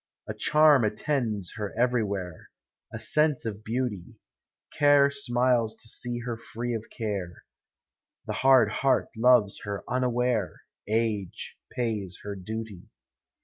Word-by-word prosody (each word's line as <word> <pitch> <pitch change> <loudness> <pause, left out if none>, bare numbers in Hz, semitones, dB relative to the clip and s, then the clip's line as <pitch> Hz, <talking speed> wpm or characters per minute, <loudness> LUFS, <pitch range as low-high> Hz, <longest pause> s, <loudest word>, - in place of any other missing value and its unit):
A - - -4
charm 150 -4 +5
attends 110 -3 -1
her 105 -1 -5
everywhere, 100 -8 -1 0.2
— - - -58
A - - -6
sense 150 +5 +2
of 105 -1 -5
beauty; 110 -6 -4 0.6
Care 145 -1 +5
smiles 120 -4 +1
to 115 - -7
see 120 +1 -2
her 120 -1 -4
free 120 +1 -5
of 110 -1 -4
care; 100 -6 -5 0.8
The - - -3
hard 130 -5 +4
heart 135 +4 +1
loves 115 -3 +4
her 100 -1 -5
unaware; 125 -4 -1 0.2
Age 110 -3 -2 0.2
pays 105 -7 -3
her 105 - -5
duty. 105 0 -7
115 Hz, 125 wpm, -27 LUFS, 105-125 Hz, 0.8 s, charm